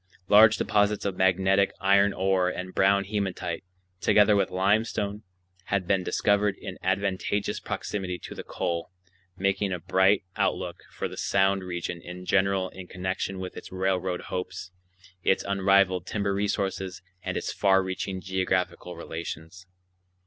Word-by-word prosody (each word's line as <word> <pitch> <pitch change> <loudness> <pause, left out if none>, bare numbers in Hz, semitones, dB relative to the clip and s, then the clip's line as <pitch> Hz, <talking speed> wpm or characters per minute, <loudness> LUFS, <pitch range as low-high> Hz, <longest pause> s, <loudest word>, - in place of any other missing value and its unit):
Large 105 +1 +7
deposits 105 0 +1
of 100 -2 -1
magnetic 95 +1 +3
iron 100 +1 +4
ore 95 -1 +1
and 90 0 -5
brown 100 +1 +4
hematite, 100 -1 -3 0.4
together 105 +2 +5
with 100 - +2
limestone, 100 +2 0 0.4
had 100 -2 0
been 95 0 +1
discovered 105 +2 +2
in 95 -2 -8
advantageous 95 +1 -1
proximity 95 -3 -4
to - - -9
the - - -7
coal, 85 -1 -3 0.5
making 100 +1 0
a 90 - -1
bright 95 +4 +3
outlook - - -1
for - - -3
the - - -10
Sound 95 0 +2
region 85 -1 -4
in 90 +1 -9
general 95 -1 +2
in 95 -1 -10
connection 95 +1 -3
with 95 0 -6
its - - -9
railroad 95 -1 -1
hopes, 90 0 -5 0.5
its 95 - +2
unrivaled 95 -2 +3
timber 100 -2 -1
resources, 95 -2 -2 0.2
and - - -3
its - - -3
far 95 -1 +3
reaching 95 0 -4
geographical 95 -1 -1
relations. 85 +2 -7
95 Hz, 140 wpm, -27 LUFS, 90-100 Hz, 0.5 s, Large